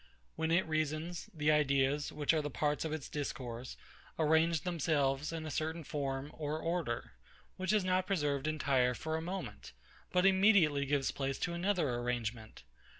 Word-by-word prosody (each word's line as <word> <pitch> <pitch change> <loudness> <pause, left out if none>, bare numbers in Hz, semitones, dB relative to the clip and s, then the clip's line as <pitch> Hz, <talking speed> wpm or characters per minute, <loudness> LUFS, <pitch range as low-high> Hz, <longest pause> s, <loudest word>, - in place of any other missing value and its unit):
When 160 0 -1
it 170 +2 +3
reasons, 155 +2 -2
the 155 -1 +1
ideas, 140 -1 +2
which 150 +1 +1
are 155 - +2
the 150 - -3
parts 150 +1 0
of 160 - -2
its 155 -3 -4
discourse, 125 -4 -5 0.4
arrange 160 0 +3
themselves 150 -5 0
in 165 -1 -4
a 155 - -4
certain 160 +3 -2
form 140 -1 -3
or 155 0 -3
order; 165 -8 -2 0.4
which 185 0 -1
is 215 -2 +3
not 185 0 +1
preserved 145 -7 0
entire 135 -5 +2
for 160 +4 -3
a 160 - -2
moment, 185 +4 -6 0.4
but 180 0 +3
immediately 190 -8 +5
gives 140 -1 +1
place 135 -1 -2
to 175 - -1
another 180 -2 +1
arrangement. 120 -2 -3
155 Hz, 160 wpm, -34 LUFS, 140-165 Hz, 0.4 s, immediately